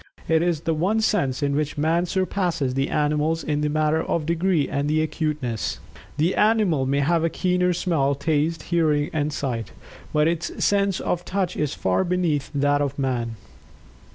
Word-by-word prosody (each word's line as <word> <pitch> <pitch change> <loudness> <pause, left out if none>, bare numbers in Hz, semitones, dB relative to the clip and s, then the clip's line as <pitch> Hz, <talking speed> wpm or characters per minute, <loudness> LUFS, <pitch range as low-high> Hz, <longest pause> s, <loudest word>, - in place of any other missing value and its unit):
It 160 -1 +3
is 170 -3 0
the 165 0 0
one 185 +8 +1
sense 145 -12 0
in 140 0 +1
which 150 0 -2
Man 165 +4 +1
surpasses 180 -8 -1
the 135 +1 0
animals 150 +2 0
in 150 -1 -1
the 150 - 0
matter 155 +1 +1
of 165 -1 -1
degree 170 -1 +1
and 140 +1 -1
acuteness. 150 -6 -1 0.4
The 165 +5 +2
animal 210 -11 +2
may 140 +1 +1
have 165 +3 +2
a 165 - +2
keener 180 +1 +1
smell, 160 -6 +1
taste, 155 +3 0
hearing 155 -4 +1
and 150 -1 0
sight, 120 -8 -3 0.4
but 150 +1 +3
its 170 0 -1
sense 200 -2 +2
of 175 0 -1
Touch 185 -1 -2
is 150 -2 -1
far 95 - +1
beneath 175 -6 0
that 145 +1 +2
of 140 -2 -2
Man. 125 -4 -1
155 Hz, 170 wpm, -23 LUFS, 145-175 Hz, 0.4 s, It